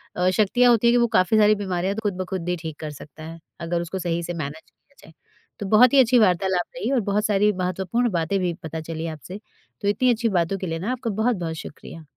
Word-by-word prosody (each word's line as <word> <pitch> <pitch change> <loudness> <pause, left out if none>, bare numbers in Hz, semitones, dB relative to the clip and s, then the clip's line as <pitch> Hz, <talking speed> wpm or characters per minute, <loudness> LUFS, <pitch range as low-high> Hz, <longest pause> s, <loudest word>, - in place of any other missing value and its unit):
अ, 180 +1 +2
शक्तियाँ 230 +5 +3
होती 235 0 +3
हैं 235 - +5
कि 245 - +4
वो 235 0 +3
काफ़ी 185 +4 +3
सारी 215 0 +5
बीमारियाँ 190 -1 -2
तो 220 - -4
खुद 200 -3 -1
ब - - -3
खुद 180 -2 -3
ही 180 - +1
ठीक 160 -2 -7
कर 155 -1 -5
सकता 150 +2 -12
है, 165 +1 -9 0.2
अगर 170 0 -2
उसको 175 +2 -5
सही 170 -1 -2
से 175 +1 -4
मैनेज 155 -1 -5
किया 280 - -37
जाए। 160 - -16 0.5
तो 205 - -4
बहुत 235 +5 +6
ही 275 - +6
अच्छी 245 0 +5
वार्तालाप 185 -3 +2
रही 250 0 -2
और 265 - +3
बहुत 210 +2 +1
सारी 210 0 +3
महत्वपूर्ण 190 +6 -1
बातें 170 +3 0
भी 180 -2 -1
पता 160 0 -5
चली 165 +1 -5
आपसे। 165 +5 -8 0.4
तो 200 - -2
इतनी 235 +5 +2
अच्छी 230 0 0
बातों 185 0 0
के 190 - -5
लिए 165 0 -3
ना 200 +8 -2
आपका 250 -2 -3
बहुत-बहुत 195 -6 -1
शुक्रिया। 160 +1 -10
185 Hz, 245 wpm, -23 LUFS, 165-220 Hz, 0.5 s, बहुत